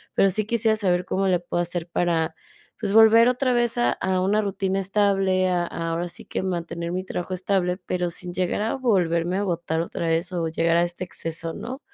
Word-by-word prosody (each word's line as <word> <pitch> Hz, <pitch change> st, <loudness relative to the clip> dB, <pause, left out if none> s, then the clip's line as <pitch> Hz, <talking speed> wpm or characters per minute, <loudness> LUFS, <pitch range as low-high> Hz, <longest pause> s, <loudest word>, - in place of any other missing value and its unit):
pero 195 Hz, -, +4 dB
sí 215 Hz, +2 st, 0 dB
quisiera 220 Hz, -1 st, +1 dB
saber 180 Hz, -3 st, +1 dB
cómo 195 Hz, +1 st, -1 dB
le 180 Hz, -2 st, +2 dB
puedo 175 Hz, 0 st, -2 dB
hacer 175 Hz, 0 st, -3 dB
para, 165 Hz, -2 st, 0 dB, 0.4 s
pues, 205 Hz, -3 st, -2 dB
volver 225 Hz, +1 st, +7 dB
otra 250 Hz, 0 st, +1 dB
vez 240 Hz, -1 st, +1 dB
a 120 Hz, 0 st, +3 dB
a 185 Hz, -1 st, -1 dB
una 205 Hz, +3 st, +2 dB
rutina 195 Hz, -1 st, -1 dB
estable, 195 Hz, -1 st, +2 dB
a 175 Hz, -1 st, +1 dB
a 165 Hz, -1 st, -4 dB
ahora 170 Hz, +2 st, -2 dB
sí -, -, -9 dB
que -, -, -3 dB
mantener 170 Hz, -2 st, -3 dB
mi 185 Hz, 0 st, -2 dB
trabajo 180 Hz, +1 st, -4 dB
estable, 185 Hz, -1 st, 0 dB
pero 180 Hz, -1 st, -1 dB
sin 175 Hz, 0 st, -6 dB
llegar 185 Hz, +2 st, -1 dB
a 220 Hz, -, -1 dB
volverme 180 Hz, -8 st, +1 dB
a -, -, 0 dB
agotar 170 Hz, -3 st, -1 dB
otra 170 Hz, 0 st, -4 dB
vez 165 Hz, +3 st, 0 dB
o 165 Hz, -2 st, -1 dB
llegar 165 Hz, +1 st, +1 dB
a 170 Hz, -, +4 dB
este 175 Hz, +1 st, -3 dB
exceso, 165 Hz, -1 st, -4 dB
¿no? 260 Hz, +2 st, -6 dB
180 Hz, 210 wpm, -24 LUFS, 170-200 Hz, 0.4 s, volver